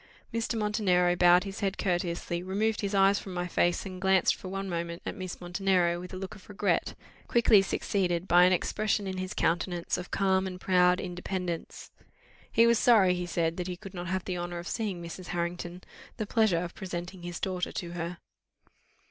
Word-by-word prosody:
Mr. 230 0 -1
Montenero 195 -5 +2
bowed 175 0 +6
his 195 +1 -6
head 195 -2 -1
courteously, 175 -1 -1
removed 205 +4 0
his 200 -1 -2
eyes 195 +1 +5
from 190 -2 -8
my 175 0 -1
face, 175 +1 +1
and 185 -1 -7
glanced 190 -1 +4
for - - -9
one 195 +1 -4
moment 170 -1 -3
at - - -3
Miss 185 -4 -6
Montenero 175 -1 +1
with 180 0 -8
a 185 - -6
look 185 0 -6
of 200 -2 -15
regret, 205 0 0 0.3
quickly 225 -4 +5
succeeded 185 -2 -1
by 175 +1 +7
an 185 - +4
expression 205 +3 0
in 190 -1 -4
his 185 0 -4
countenance 170 +1 0
of 180 - -7
calm 190 -1 +1
and 180 -1 -6
proud 180 -1 +3
independence. 180 -1 -5 0.6
He 230 - +5
was 235 -1 +4
sorry, 205 -7 +5
he 180 0 -3
said, 165 -1 0
that 180 -1 -3
he 180 -1 -4
could 195 0 -10
not 175 -1 -5
have 185 0 -2
the 180 -2 -3
honour 175 0 -4
of 170 +1 -6
seeing 200 -6 -3
Mrs. 175 +2 -8
Harrington 175 +1 -4 0.3
the 215 - -2
pleasure 205 -6 +2
of 175 - -6
presenting 180 0 -6
his 175 0 -6
daughter 185 -2 -2
to 170 -1 -5
her. 175 0 -4
180 Hz, 195 wpm, -29 LUFS, 175-195 Hz, 0.6 s, by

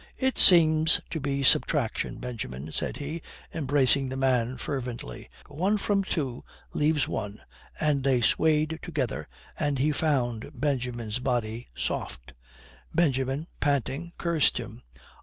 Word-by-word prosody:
"It 265 -1 0
seems 160 -2 +7
to 160 - -2
be 140 -1 -2
subtraction, 135 -2 +2
Benjamin," 80 - -6
said - - -2
he, 155 +3 -5 0.3
embracing 140 -3 +2
the 130 - -4
man 130 -2 +1
fervently. 120 - -6 0.2
"One 185 +9 0
from 200 -1 0
two 135 -10 -3 0.3
leaves 150 -2 +1
one," 105 0 -4 0.4
and 145 -3 +1
they 130 -2 +3
swayed 155 +5 +2
together, 145 - -3 0.3
and 145 -1 0
he 145 +4 +2
found 135 -5 -1
Benjamin's 125 -5 -2
body 120 -2 -2
soft. - - -4 0.6
Benjamin, 135 -2 0
panting, 145 +4 -1
cursed 170 -4 +2
him. - - -7
140 Hz, 120 wpm, -27 LUFS, 125-155 Hz, 0.6 s, seems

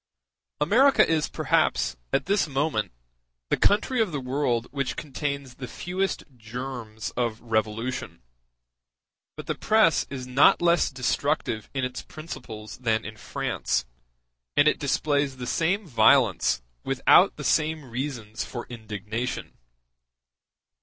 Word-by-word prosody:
America 245 - +5
is 160 -2 +1
perhaps, - - +1 0.2
at - - +1
this 200 -1 +2
moment, 135 - -1 0.6
the - - +5
country 225 +4 +2
of 215 -5 +1
the 150 - -2
whole 125 -1 -7
world 125 -5 +1
which 140 -1 -2
contains 140 -2 -4
the 125 0 -7
fewest 185 +8 -2
germs 115 -1 -6
of 120 -2 -2
revolution; 110 - -2 1.1
but - - -8
the - - -1
press 215 -7 +3
is 130 -2 -5
not 125 +3 +5
less 170 -1 +3
destructive 130 -3 -1
in 130 -1 0
its 125 0 -5
principles 110 -9 -9
than 110 -3 0
in 110 +1 -7
France, 65 - -2 0.7
and 145 - +6
it - - +3
displays 140 -1 0
the 125 - -5
same 175 - 0
violence 115 - +4 0.2
without - - +5
the - - -7
same 155 -1 +1
reasons 120 -3 -4
for 120 -2 -6
indignation. 110 +1 -5
130 Hz, 125 wpm, -26 LUFS, 115-155 Hz, 1.1 s, and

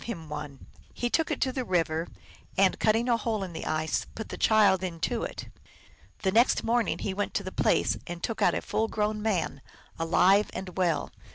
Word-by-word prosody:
him 170 -9 -6
one: 145 -2 -7 0.3
he 240 0 -2
took 325 - +2
it - - -2
to 260 - +1
the 255 0 -2
river, 165 -5 0 0.5
and, 195 -1 +3
cutting 225 +2 +2
a 235 -2 +3
hole 220 -2 -2
in 180 -2 -6
the 160 - -5
ice, 155 0 -1
put 220 - -6
the - - -5
child 200 -4 +4
into 185 +6 -2
it. - - -5 0.8
The 190 - +2
next 235 +5 +4
morning 235 0 +1
he 195 - -3
went 205 +1 -3
to - - 0
the - - -5
place, - - +2
and 175 0 -6
took 225 - -3
out - - +4
a - - -2
full 220 +1 0
grown 215 -1 -1
man, 185 -10 -1 0.4
alive 185 +5 +4
and 185 -1 -6
well. 175 -4 0
195 Hz, 200 wpm, -28 LUFS, 170-225 Hz, 0.8 s, child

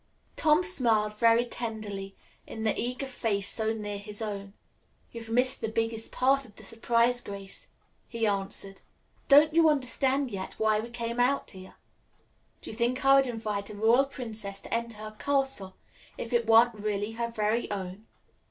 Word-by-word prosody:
Tom 310 +3 +4
smiled 225 - +1
very 230 +1 +5
tenderly 215 -5 -5 0.3
into 220 - -6
the 220 - 0
eager 250 +3 -3
face 220 -6 -2
so 220 +1 0
near 205 -2 -4
his 205 0 -8
own. 200 -3 -5 0.6
"You've 230 -1 -9
missed 250 +3 +2
the 225 - -1
biggest 225 0 -2
part 275 +2 +2
of 215 -5 -16
the - - -13
surprise, 235 +1 +1
Grace," 200 -3 -8 0.4
he 230 -2 -2
answered. 195 -1 -2 0.5
"Don't 295 +2 +7
you 325 -1 +6
understand 270 -1 0
yet 190 -2 -5
why 215 -1 +2
we 230 +2 -5
came 235 0 -4
out 265 +3 +1
here? 185 0 -12 0.9
Do - - -7
you - - -7
think 245 +3 0
I 275 0 +7
would 270 -1 +3
invite 215 -4 -3
a - - -8
royal 230 +6 +4
princess 220 -7 -5
to - - -6
enter 230 -1 -2
her 215 0 -8
castle 270 -9 -1 0.4
if 230 - -6
it 235 -1 +2
weren't 230 +1 +6
really 210 0 -2
her 235 +1 -2
very 220 +1 -1
own?" 195 +1 -6
225 Hz, 170 wpm, -28 LUFS, 210-245 Hz, 0.9 s, Don't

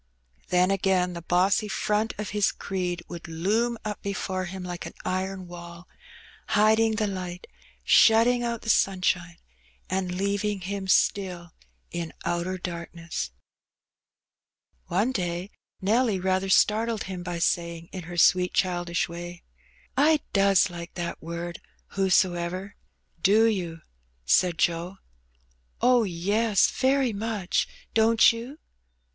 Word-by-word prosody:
Then 180 +1 +3
again 190 -2 +1
the 170 - -6
bossy 185 +5 +2
front 210 +1 -1
of 210 -1 -4
his 205 0 +2
creed 180 -2 -3
would 175 -1 -8
loom 210 +9 0
up 210 -1 -4
before 190 -1 -3
him 185 +1 -7
like 175 -1 -5
an - - -11
iron 185 0 -2
wall, 170 0 -10 0.6
hiding 220 +1 +3
the 220 -1 0
light, 185 -3 -5 0.4
shutting 235 +2 +5
out 235 -1 -3
the 225 - -5
sunshine, 185 -3 +1 0.5
and 185 -1 -1
leaving 200 +1 -1
him 195 +1 -4
still 180 -3 +1 0.4
in 170 -1 -4
''outer 175 +2 -1
dark 170 -2 -5
ness/' 165 - -4 1.6
One 195 +8 +1
day 180 -3 -3 0.3
Nelly 215 +1 +2
rather 190 +1 0
startled 220 +3 +3
him 185 -1 -6
by 175 -1 -4
saying, 170 0 -1
in 185 -3 -7
her 175 +1 -7
sweet 180 +1 +4
childish 175 -2 0
way 175 +1 -8 0.5
"I 300 +2 +4
does 195 -1 +4
like 170 0 -8
that 175 -1 -4
word 170 +1 -6 0.3
who 195 0 0
so 185 -1 +4
ever!^'. 180 +3 -4 0.5
"Do 210 +4 +5
you?^' 175 -7 -1 0.4
said 170 - +3
Joe. 175 +3 0 0.8
''Oh, 250 0 +4
yes, 200 +4 +2
very 265 -2 +1
much; 205 -3 -1 0.3
don't 225 +1 +5
you?" 240 +6 -8
185 Hz, 130 wpm, -26 LUFS, 175-210 Hz, 1.6 s, shutting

